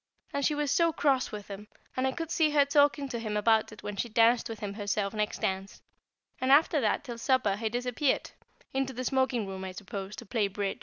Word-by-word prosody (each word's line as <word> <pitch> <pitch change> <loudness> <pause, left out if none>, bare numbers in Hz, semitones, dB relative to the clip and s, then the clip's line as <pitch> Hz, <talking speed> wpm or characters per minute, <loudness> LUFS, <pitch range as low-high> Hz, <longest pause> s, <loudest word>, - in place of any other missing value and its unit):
And 280 - -1
she 300 - +2
was 295 -1 0
so 335 +1 +3
cross 275 -4 +1
with 210 -1 -7
him, 205 +1 -8 0.3
and 255 +1 +1
I - - +1
could 330 +3 -5
see 320 -3 +3
her 290 -1 +4
talking 285 0 +3
to 235 - -3
him 215 -2 -2
about 220 +1 +3
it 215 - -12
when 205 -1 -5
she 235 - -2
danced 230 +2 +3
with 225 -2 -6
him 205 -1 -4
herself 205 -1 -2
next 210 -1 -2
dance; 190 +1 -3 0.6
and 260 +1 +1
after 300 +1 +5
that - - +1
till 240 -4 -7
supper 250 -6 +2
he 220 +2 -2
disappeared 250 +4 0 0.4
into 265 0 -1
the 255 +1 -4
smoking 260 -3 +1
room, 190 -1 -6
I 190 -1 -5
suppose, 195 +1 -6
to 235 - -9
play 215 -1 0
"Bridge." 200 0 -3
235 Hz, 225 wpm, -29 LUFS, 205-270 Hz, 0.6 s, after